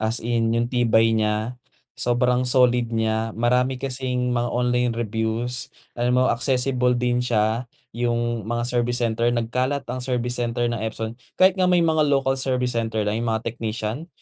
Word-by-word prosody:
As 110 +1 0
in 115 -1 0
yung 115 - +2
tibay 115 -2 +3
niya, 110 +3 -1 0.3
sobrang 125 +1 +1
solid 125 -2 +3
niya. 110 -1 -1
Marami 125 +3 +1
kasing 125 -1 -2
mga 120 0 0
online 125 0 +1
reviews, 115 +2 -2 0.2
alam 125 +1 0
mo 130 - +4
accessible 125 0 +1
din 120 0 +1
siya. 115 0 0 0.2
Yung 120 -2 -1
mga 120 0 -1
service 120 0 0
center, 115 0 +1
nagkalat 125 +4 -1
ang 130 - -4
service 125 -1 -1
center 120 0 -1
ng 115 - -3
Epson. 110 +1 -4 0.2
Kahit 190 +1 +4
nga 185 -1 +3
may 175 -2 +4
mga 160 -1 +2
local 135 -1 +2
service 125 -1 0
center 110 -2 -1
na 105 - 0
yung 115 +2 -2
mga 110 0 -1
technician, 115 +6 -4
120 Hz, 165 wpm, -23 LUFS, 115-125 Hz, 0.3 s, mo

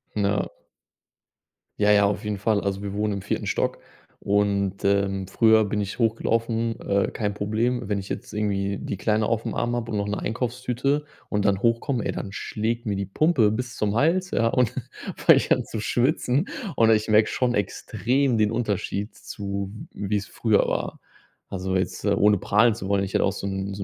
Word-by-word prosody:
Ja. 100 -1 +1 1.3
Ja, 105 0 +4
ja, 100 -1 +5
auf 100 +1 -1
jeden 105 -1 -2
Fall. 105 +1 +1
Also, 100 0 -2
wir 100 -1 -4
wohnen 105 0 0
im 100 - -4
4. - - -2
Stock - - -1 0.4
und, 100 -1 0
ähm, 100 -1 +1
früher 110 +1 +4
bin 105 +1 -1
ich 100 - -4
hochgelaufen, 115 0 0
äh, 100 0 +1
kein 105 -2 -2
Problem. 115 +5 0
Wenn 100 - +1
ich 95 0 -6
jetzt - - -5
irgendwie 100 -2 -1
die - - -4
Kleine 105 +2 +1
auf'm 115 0 -1
Arm 120 0 0
habe 120 -1 -3
und 105 - -1
noch 100 0 -1
'ne 105 - -2
Einkaufstüte 125 +5 -1 0.3
und 105 -1 0
dann 100 0 +1
hochkomme, 115 +1 +1
ey - - 0
dann 100 - -5
schlägt 115 +4 -3
mir 105 -2 -1
die 100 -1 -3
Pumpe 130 - +3
bis 120 +1 -3
zum 105 0 -1
Hals, 180 +8 +2
ja, 115 - +2
und 125 -2 +2 0.5
fange - - +6
ich - - -1
an - - +3
zu 110 - -5
schwitzen. 130 - +1 0.3
Und 115 -1 +5
ich 110 0 +2
merke 110 0 +5
schon 125 -1 0
extrem 125 +5 0
den 105 0 +2
Unterschied 105 -2 -2
zu, 100 -1 -5 0.2
w 100 -1 -5
wie - - +4
es 100 - -5
früher 110 -3 +2
war. - - -2 0.5
Also, 95 0 -3
jetzt, 95 +2 -2
äh, 100 - +3
ohne 105 0 +4
prahlen 105 +4 +3
zu 95 -4 -6
wollen, 100 -1 +1
ich 95 - -5
hatte - - +3
auch 95 - +2
so 100 0 -5
'n 95 0 -3
so 100 0 -5
105 Hz, 200 wpm, -24 LUFS, 100-115 Hz, 1.3 s, fange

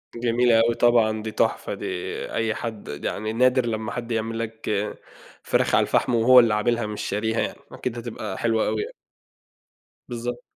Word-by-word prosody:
جميلة 120 0 +3
أوي 115 +1 +3
طبعًا، 115 -3 +3
دي 110 - -4
تُحفة - - 0
دي - - -6 0.5
أي 110 -1 0
حد 115 -3 -6 0.2
يعني 110 +1 -2
نادر 125 +1 +3
لمّا 110 -1 -3
حد 120 -1 -5
يعمل 115 0 -2
لك 115 -1 -5 0.7
فراخ - - +2
على - - +4
الفحم 125 - +1
وهو 125 +3 +7
اللي 115 -3 +4
عاملها 120 +2 +1
مش 105 -1 -5
شاريها 110 +3 -1
يعني، - - -3
أكيد 120 -2 -4
هتبقى 115 -4 -5
حلوة 115 -2 +1
أوي 110 0 0
يع - - -4 1.2
بالضبط. 120 0 -4
115 Hz, 165 wpm, -24 LUFS, 110-120 Hz, 1.2 s, وهو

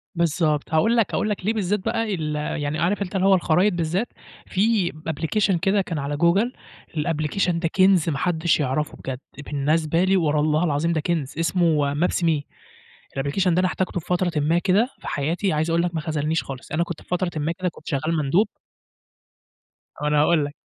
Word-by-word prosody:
بالضبط، 160 -3 0
هاقول 225 +10 +3
لك 230 - +1
هاقول 215 - 0
لك 200 -3 -3
ليه 220 - +2
بالذات 205 -1 0
بقى 225 +2 -1
ال 155 -3 -3
يعني 150 0 -2
عارف 200 +5 +1
أنت 195 0 -4
اللي 190 0 +2
هو 195 - +6
الخرايط 180 +3 +2
بالذات 175 +6 -1 0.4
في 200 -2 +1 0.2
أبليكشن 170 +5 +1
كده 195 +4 +2
كان 175 -4 -4
على 140 +1 -3
جوجل 190 - +2 0.4
الأبلكيشن 165 +3 0
ده 165 - 0
كِنز 185 -1 +3
ما 145 - -1
حدش 170 0 +1
يعرَفه 150 +1 -1
بجد، 130 -1 -5 0.3
بالنسبة 155 +4 +1
لي 190 +1 +3
ور 155 -4 +1
الله 155 +2 +2
العظيم 165 +1 +1
ده 160 - 0
كِنز 160 -4 -2
اسمه 165 -4 +2
maps 175 +3 0
me 160 -3 +2 0.7
الأبلكيشن 155 +7 +1
ده - - +3
أنا 185 - +3
احتاجته 180 0 -2
في 160 - -14
فترةٍ 180 0 +1
ما 160 +4 +2
كده 195 +6 +2
في - - -10
حياتي 165 +7 -1
عايز 155 +2 0
أقول 165 +1 +2
لك 175 -1 -2
ما 160 - -1
خذلنيش 155 0 -1
خالص، 135 -1 -9
أنا 160 +3 +1
كنت 170 -2 -7
في - - -20
فترةٍ 180 0 0
ما 150 +2 0
كده 185 +1 -2
كنت - - -17
شغال 155 +3 -1
مندوب 175 +10 +3 1.5
ما 150 - 0
أنا 150 0 +3
هاقول 155 -1 +3
لك. 145 - -7
165 Hz, 195 wpm, -23 LUFS, 150-185 Hz, 1.5 s, هو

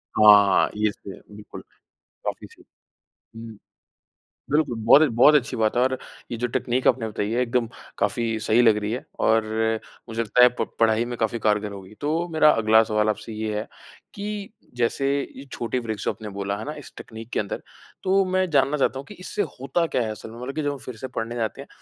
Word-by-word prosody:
हाँ, 105 -2 +6 0.2
इस 100 - -3
पे, 95 - -8 0.2
बिल्कुल। 105 - -10 0.6
काफ़ी - - -4
सही। - - -20 0.7
हुँ। 115 -2 -9 0.9
बिल्कुल, 150 -5 +1
बहुत 140 +6 +7
ए - - +6
बहुत 140 +6 +6
अच्छी 130 -5 +1
बात 110 +1 +1
है 125 - +3
और 130 0 +1 0.3
ये 120 - -3
जो 125 +1 -1
तकनीक 125 +2 0
आपने 115 -3 +1
बताई 105 0 -3
है, 120 +2 0
एकदम 120 -1 0 0.3
काफ़ी 110 +2 0
सही 115 +2 +3
लग 110 -3 +5
रही 105 0 -2
है, 125 - -4
और 110 0 +3 0.6
मुझे 115 +1 -2
लगता 125 +3 +3
है, 125 - +9
प 125 - -4 0.2
पढ़ाई 110 +1 +3
में 120 0 -5
काफ़ी 115 +1 0
कारगर 105 -1 0
होगी। 95 +1 -11
तो 160 +4 -1
मेरा 155 -1 +6
अगला 110 -1 +4
सवाल 105 0 +1
आपसे 105 +1 -3
ये 110 -1 -3
है 110 - -4 0.5
कि 205 0 -5 0.3
जैसे 130 +3 0 0.3
ये 135 - -9
छोटे 120 +2 -2
ब्रेकस, 110 -3 -5
जो - - +1
आपने 110 - -7
बोला, 100 0 -3
है - - -6
ना? 150 +2 -5
इस 145 - -11
तकनीक 115 +1 -10
के - - +1
अंदर, 100 - -5 0.4
तो 195 +1 +3
मैं 185 0 0
जानना 140 0 +3
चाहता 135 -1 0
हूँ 135 - -8
कि 210 - -11
इससे 205 - -2 0.2
होता 165 +6 0
क्या 125 - 0
है 110 - -2
असल 110 +1 -8
में? 115 +1 -11
मतलब 135 +2 -5
कि 155 - -2
जब 145 - 0
हम 140 - -7
फिर 125 -3 -8
से 130 +3 -6
पढ़ने 115 +1 -4
जाते 110 -3 -3
हैं, - - -11
115 Hz, 215 wpm, -24 LUFS, 110-135 Hz, 0.9 s, है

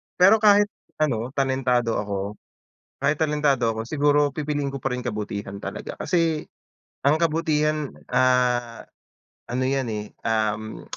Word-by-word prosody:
Pero 195 +5 +6
kahit 205 -1 +5 0.3
ano, 125 -3 -1
talentado 130 -4 +1
ako, 100 0 -4 0.6
kahit 150 +2 +1
talentado 145 -6 +2
ako, 110 0 -4
siguro 145 +1 +2
pipiliin 145 -2 -2
ko 140 - -6
pa 135 - -1
rin 125 -1 -3
kabutihan 100 -1 -4
talaga. - - -6
Kasi 165 -3 0 0.6
ang 150 +4 +3
kabutihan, 155 -2 +1 0.2
ah, 125 -2 +2 0.6
ano 125 +1 -2
yan, 135 -1 0
eh, 105 0 -4 0.2
um, 110 -1 -1
135 Hz, 125 wpm, -24 LUFS, 115-150 Hz, 0.6 s, Pero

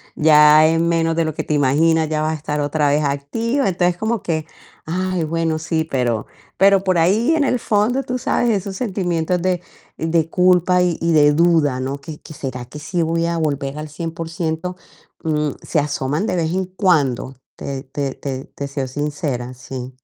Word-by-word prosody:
ya 150 0 +6
en 165 +1 +2
menos 165 -1 +1
de 165 - +1
lo 155 -2 -3
que - - -2
te 150 - -2
imaginas 155 +3 +3
ya 155 -1 0
vas 155 - 0
a - - -2
estar 150 0 -3
otra 145 0 +1
vez 150 +1 +2
activa", 225 - -1
entonces 175 -1 +1
como 220 +2 -1
que: 160 -2 -2 0.4
"Ay, 185 +1 -1
bueno, 165 0 -1
sí", 160 0 -1
pero, 125 -8 -1 0.3
pero 195 0 +5
por 185 -2 +1
ahí 210 - +3
en 305 - +2
el 250 -2 +1
fondo, 225 +7 +1
tú 250 - -3
sabes, 240 0 0
esos 195 -2 -1
sentimientos 180 -6 -1
de, 180 -1 0 0.4
de 165 0 0
culpa 180 0 +3
y 175 -2 +1
y 170 - +1
de 150 -2 +5
duda, 160 -5 +3
¿no?, 135 +2 -3
que, 150 +1 -9
que - - -11
¿Será 130 -4 -5
que 150 +5 -10
sí 170 +4 -2
voy 165 +1 0
a 170 0 -1
volver 145 -2 -2
al 155 0 -6
100%?. 165 +2 -4 0.5
Mm, 150 -2 0
se 160 - 0
asoman 145 +3 -1
de 185 - -1
vez 165 0 0
en 190 0 0
cuando, 155 - +1 0.2
te 135 -1 -5
te 135 0 -4
te 135 -1 -5
te 140 - -7
soy 140 -2 -3
sincera, 145 -3 -3
sí. 130 0 -7
160 Hz, 190 wpm, -20 LUFS, 145-180 Hz, 0.5 s, ya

